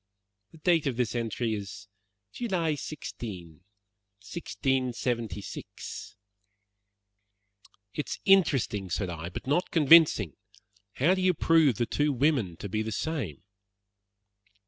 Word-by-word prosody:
"The - - -15
date 165 -2 +2
of 125 -4 -2
this 125 -3 0
entry 115 -1 -1
is 105 0 -6 0.4
July 180 -9 -1
16, 100 - -7 0.6
1676." 125 - -3 1.8
"It 150 - -4
is - - -4
interesting," 135 - +3
said 90 +1 -2
I, 85 0 -5
"but 90 - -7
not 150 +7 +1
convincing. 150 - +6 0.6
How 160 +8 +3
do 190 - -1
you 185 -1 +3
prove 160 -6 +4
the 120 - 0
two 145 +5 +1
women 130 - +1
to - - -6
be 110 +3 -1
the 110 0 -3
same?" 105 - -3
125 Hz, 115 wpm, -28 LUFS, 105-160 Hz, 1.8 s, convincing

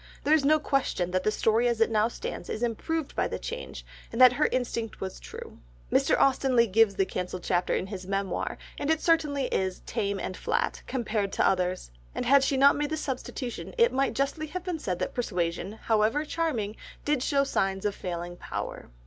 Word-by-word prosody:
There 300 - +3
is 315 -2 +4
no 305 +2 +5
question 275 - 0
that 185 0 0
the - - +3
story 225 +3 +2
as 235 -2 0
it 225 0 +3
now 215 0 +3
stands 235 - -6
is 220 - -3
improved 285 +7 -2
by - - +1
the - - -4
change, 485 +1 -6 0.3
and 230 - -4
that 255 -1 +9
her 300 +4 +2
instinct 235 -3 -2
was 190 -1 -5
true. - - -10 0.3
Mr. - - +3
Austen 265 -1 +3
Leigh 235 -1 +6
gives 215 -1 +3
the 195 -1 +2
cancelled 180 -1 -4
chapter 175 +1 +1
in - - -1
his 190 -2 -7
Memoir, 195 -1 -2 0.2
and 285 - -2
it 320 -1 +3
certainly 300 -5 +2
is 190 -1 -1
"tame 200 -1 -2
and 185 - -4
flat" - - -1
compared 225 -5 -1
with - - -8
the - - +4
others, 180 - 0 0.2
and - - -2
had 275 +1 +6
she 275 0 +1
not 280 +1 +6
made 295 0 -1
the 315 - -2
substitution 260 - -5
it 470 0 +4
might 270 +1 +1
justly 280 +3 -1
have 365 +3 -5
been 360 -3 -3
said 185 - -2
that - - -3
Persuasion, 180 -4 -2
however 225 +7 +2
charming, 245 -11 -2 0.3
did 290 -3 +1
show 275 +1 +2
signs 195 -7 -1
of 205 - +1
failing 175 -1 -5
power. - - -6
235 Hz, 210 wpm, -28 LUFS, 195-285 Hz, 0.3 s, that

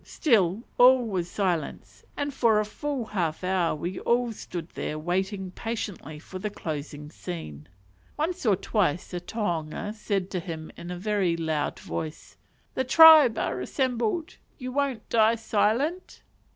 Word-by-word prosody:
Still 215 - +2 0.2
all 250 0 +7
was 185 -5 -2
silence, 180 -6 -3
and 285 0 -2
for 230 -5 +3
a 215 - 0
full 275 +3 -4
half 175 -6 -2
hour 180 -3 +1
we 175 +4 -4
all 240 0 +1
stood 175 -6 -7
there, 150 - -4
waiting 190 +4 -2
patiently 200 -8 -5
for 185 +4 -9
the 210 - -3
closing 150 -5 -6
scene. 120 - -7 0.5
Once 345 +4 -2
or 215 -5 +4
twice 185 -4 0
the 180 - -3
tohunga 175 -1 -3
said 200 -3 -2
to 185 - -1
him 165 -3 -7
in 175 - -9
a 180 - -4
very 190 -3 0
loud 160 -3 -1
voice, 155 0 -6 0.4
"The 260 - 0
tribe 305 -3 +8
are 130 - -1
assembled, 250 - -1 0.2
you 255 -2 -6
won't 275 -4 -1
die 225 0 +4
silent?" 230 - -1
200 Hz, 150 wpm, -26 LUFS, 170-235 Hz, 0.5 s, tribe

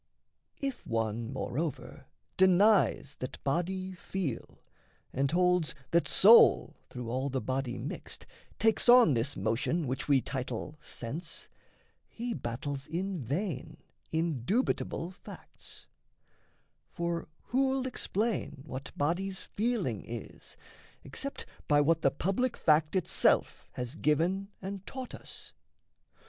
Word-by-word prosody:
If 275 -2 -3
one, 115 +1 -1
moreover, 135 +3 -4 0.3
denies 190 -5 +4
that 130 - -5
body 185 +6 -1
feel, 180 -7 -5 0.5
And 135 +1 +1
holds 180 -1 +2 0.2
that 170 0 +3
soul, 225 +4 +7
through 125 -2 -5
all 130 +3 -1
the 130 0 -1
body 130 -1 -2
mixed, - - -6 0.3
Takes 225 +2 +3
on 240 - +8
this 120 +4 0
motion 115 - 0
which 130 0 -2
we 140 -2 +5
title 130 +2 -4
"sense," 150 +9 -5 0.6
He 235 +1 -4
battles 135 - -4
in 180 +3 -2
vain 145 - -3 0.3
indubitable 165 - 0
facts: 190 - -10 1.0
For 170 -1 -2 0.2
who'll 265 +1 +2
explain 215 - -2
what 135 -2 -6
body's 190 +6 -1
feeling 235 +3 -1
is, - - -8 0.5
Except 275 0 -5 0.2
by 145 -1 +5
what 160 +3 +3
the 135 - +5
public 195 - -1
fact 155 +2 +3
itself 185 - +2
Has 125 0 -4
given 165 +6 +1 0.2
and 195 0 -5
taught 260 -2 -6
us?" - - -6
165 Hz, 110 wpm, -31 LUFS, 135-195 Hz, 1.0 s, on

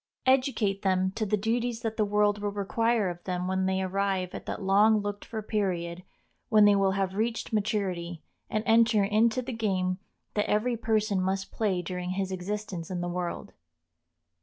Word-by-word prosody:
Educate 255 -7 +2
them 190 -1 +1
to 215 +2 -2
the 210 +2 +2
duties 230 +2 -1
that 225 -2 -2
the 220 - +2
world 210 0 +2
will 205 - 0
require 210 +2 +1
of 175 -1 -5
them 180 -1 -2
when 190 0 0
they 190 0 0
arrive 190 -1 -1
at - - -8
that - - -3
long 205 +3 +5
looked 205 0 -4
for 220 - -5
period 180 -5 -2 0.5
when 215 -2 +6
they 205 0 +6
will 195 -1 +2
have 195 -1 -1
reached 225 +3 -2
maturity, 190 -6 -1 0.3
and 215 0 -1
enter 225 -2 +4
into 220 +5 +2
the 255 +1 -5
game 190 -4 0 0.3
that 210 - 0
every 235 +4 +1
person 215 -3 +1
must 190 +1 -2
play 190 -5 0
during 180 0 -4
his 190 0 -2
existence 190 -2 -4
in 180 -2 -3
the 175 - -2
world. 175 0 -4
200 Hz, 180 wpm, -28 LUFS, 185-220 Hz, 0.5 s, when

